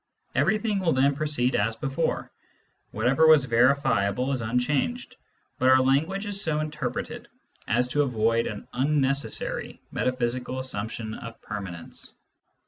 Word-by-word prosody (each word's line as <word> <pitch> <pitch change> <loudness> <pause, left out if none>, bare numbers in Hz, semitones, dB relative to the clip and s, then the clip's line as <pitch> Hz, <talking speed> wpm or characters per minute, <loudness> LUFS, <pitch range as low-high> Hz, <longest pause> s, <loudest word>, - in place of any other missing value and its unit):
Everything 215 -1 +1
will 175 -4 +1
then 135 +2 +3
proceed 145 -4 +1
as 110 +2 +1
before: 140 +5 -2 0.6
whatever 125 +9 +3
was 155 -4 +7
verifiable 125 -2 +2
is 130 -3 -1
unchanged, 130 - -1 0.4
but 130 - +4
our 130 0 +7
language 155 +10 +1
is 200 -1 0
so 155 -5 +1
interpreted 150 -3 -4 0.4
as 125 +2 +2
to 145 +3 +2
avoid 115 -3 +1
an 105 -2 -7
unnecessary 140 +1 0
metaphysical 125 0 -1
assumption 110 -3 -3
of 115 +1 -9
permanence. 95 -5 -6
130 Hz, 125 wpm, -26 LUFS, 115-150 Hz, 0.6 s, was